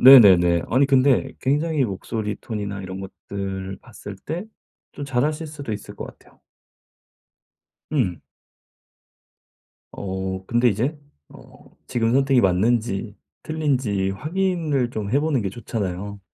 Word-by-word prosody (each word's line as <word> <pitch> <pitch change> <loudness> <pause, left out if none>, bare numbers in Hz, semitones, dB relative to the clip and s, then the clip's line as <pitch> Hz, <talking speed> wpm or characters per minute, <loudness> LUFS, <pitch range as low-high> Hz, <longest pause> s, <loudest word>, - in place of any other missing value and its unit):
네네네. 95 -10 +9
아니 130 +4 +4
근데 135 0 +3
굉장히 150 +1 +1
목소리 105 +1 -3
톤이나 100 -3 -4
이런 95 +1 -6
것들을 95 0 -5
봤을 105 -3 -9
때 160 - -5 0.5
좀 145 - -6
잘하실 145 +4 0
수도 145 -6 -6
있을 105 -1 -6
것 - - -6
같아요. - - -17 1.5
음. 95 - +1 1.7
어 95 -1 -4
근데 120 +3 +3
이제 120 +8 0 0.3
어 - - -16 0.2
지금 115 -1 +1
선택이 135 -1 +4
맞는지 100 +2 +1 0.3
틀린지 130 -11 0
확인을 155 - 0
좀 105 -3 -4
해 135 - +4
보는 145 -7 +1
게 100 - -1
좋잖아요. 100 -2 -4
115 Hz, 240 characters per minute, -23 LUFS, 95-140 Hz, 1.7 s, 네네네